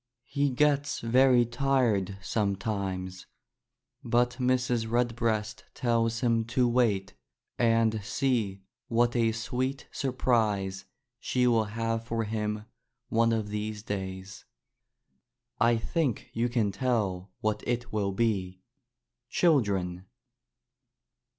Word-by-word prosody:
He 140 Hz, +2 st, 0 dB
gets 145 Hz, +2 st, +1 dB
very 125 Hz, +1 st, +4 dB
tired 120 Hz, -6 st, +1 dB
sometimes, 95 Hz, -3 st, -2 dB, 0.8 s
but 120 Hz, 0 st, +2 dB
Mrs. 125 Hz, -2 st, +1 dB
Redbreast 115 Hz, -2 st, 0 dB
tells 115 Hz, -1 st, +1 dB
him 115 Hz, -2 st, +2 dB
to 125 Hz, +2 st, +2 dB
wait 115 Hz, -6 st, +1 dB, 0.5 s
and 115 Hz, -2 st, +2 dB
see 110 Hz, -6 st, -1 dB, 0.2 s
what 120 Hz, +1 st, +2 dB
a 115 Hz, -2 st, +3 dB
sweet 125 Hz, +4 st, -3 dB
sur 135 Hz, -, -2 dB
prise 105 Hz, -7 st, 0 dB, 0.3 s
she 125 Hz, +1 st, 0 dB
will 115 Hz, -3 st, +3 dB
have 115 Hz, +1 st, -2 dB
for 115 Hz, 0 st, -2 dB
him 105 Hz, 0 st, -3 dB, 0.4 s
one 115 Hz, +1 st, +3 dB
of 110 Hz, -2 st, -1 dB
these 105 Hz, 0 st, -4 dB
days. 95 Hz, -2 st, -5 dB, 1.2 s
I 115 Hz, +1 st, +4 dB
think 135 Hz, +1 st, -2 dB
you 120 Hz, +2 st, 0 dB
can 115 Hz, -4 st, +1 dB
tell 100 Hz, -6 st, -1 dB
what 105 Hz, 0 st, 0 dB
it 120 Hz, -1 st, -2 dB
will 100 Hz, -2 st, 0 dB
be, 95 Hz, -4 st, -1 dB, 0.7 s
children. 95 Hz, -, +1 dB
115 Hz, 105 wpm, -28 LUFS, 105-120 Hz, 1.2 s, very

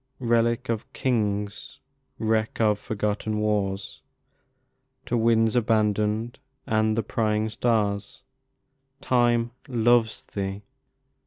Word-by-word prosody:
Relic 120 Hz, 0 st, +1 dB
of 115 Hz, -1 st, -3 dB
Kings! 105 Hz, -4 st, -2 dB, 0.4 s
Wreck 110 Hz, -1 st, 0 dB
of 105 Hz, -2 st, +3 dB
forgotten 105 Hz, -1 st, -2 dB
wars, 100 Hz, -2 st, -1 dB, 1.0 s
To 120 Hz, -, -1 dB
winds 115 Hz, 0 st, +3 dB
abandoned 110 Hz, 0 st, +1 dB, 0.3 s
and 110 Hz, -2 st, +1 dB
the 115 Hz, -, +1 dB
prying 110 Hz, -1 st, 0 dB
stars, 105 Hz, -4 st, -1 dB, 0.8 s
10 -, -, -15 dB
Time 120 Hz, -1 st, +3 dB, 0.2 s
'loves' 120 Hz, -2 st, +2 dB
Thee! 100 Hz, 0 st, -4 dB
110 Hz, 95 wpm, -25 LUFS, 105-115 Hz, 1.0 s, of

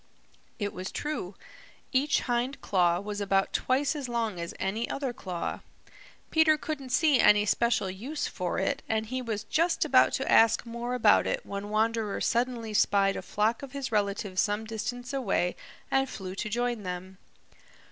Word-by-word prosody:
It 205 Hz, -2 st, -3 dB
was 185 Hz, +2 st, -5 dB
true. 295 Hz, -11 st, -4 dB, 0.6 s
Each 280 Hz, +2 st, +2 dB
hind 245 Hz, +3 st, -1 dB
claw 175 Hz, -3 st, +2 dB
was 205 Hz, +1 st, -5 dB
about 195 Hz, -1 st, +1 dB
twice 275 Hz, +4 st, +1 dB
as 275 Hz, -4 st, -4 dB
long 225 Hz, -6 st, -1 dB
as 170 Hz, 0 st, -4 dB
any 210 Hz, +5 st, -2 dB
other 270 Hz, -3 st, -2 dB
claw. 180 Hz, -6 st, -4 dB, 0.7 s
Peter 315 Hz, -1 st, +5 dB
couldn't 295 Hz, -4 st, -5 dB
see 290 Hz, 0 st, +4 dB
any 210 Hz, 0 st, +6 dB
special 235 Hz, -1 st, +2 dB
use 235 Hz, +12 st, -4 dB
for -, -, -3 dB
it -, -, 0 dB
and 220 Hz, 0 st, 0 dB
he 255 Hz, +3 st, -3 dB
was 220 Hz, -3 st, -3 dB
just 330 Hz, +8 st, +1 dB
about -, -, +5 dB
to -, -, -1 dB
ask 225 Hz, +1 st, +5 dB
more 235 Hz, +1 st, -4 dB
about 250 Hz, -, +4 dB
it -, -, -2 dB
when 200 Hz, +1 st, -5 dB
Wanderer 220 Hz, -1 st, 0 dB
suddenly 235 Hz, -2 st, -1 dB
spied 200 Hz, -1 st, +3 dB
a -, -, -4 dB
flock 220 Hz, +3 st, 0 dB
of 275 Hz, -1 st, -9 dB
his 275 Hz, -3 st, -4 dB
relatives 200 Hz, -2 st, 0 dB
some 210 Hz, +1 st, -1 dB
distance 235 Hz, +4 st, -5 dB
away 210 Hz, -9 st, 0 dB, 0.4 s
and 270 Hz, 0 st, +2 dB
flew 185 Hz, -5 st, -6 dB
to 215 Hz, +3 st, -4 dB
join 240 Hz, 0 st, -1 dB
them. 185 Hz, 0 st, -6 dB
225 Hz, 165 wpm, -28 LUFS, 200-255 Hz, 0.7 s, any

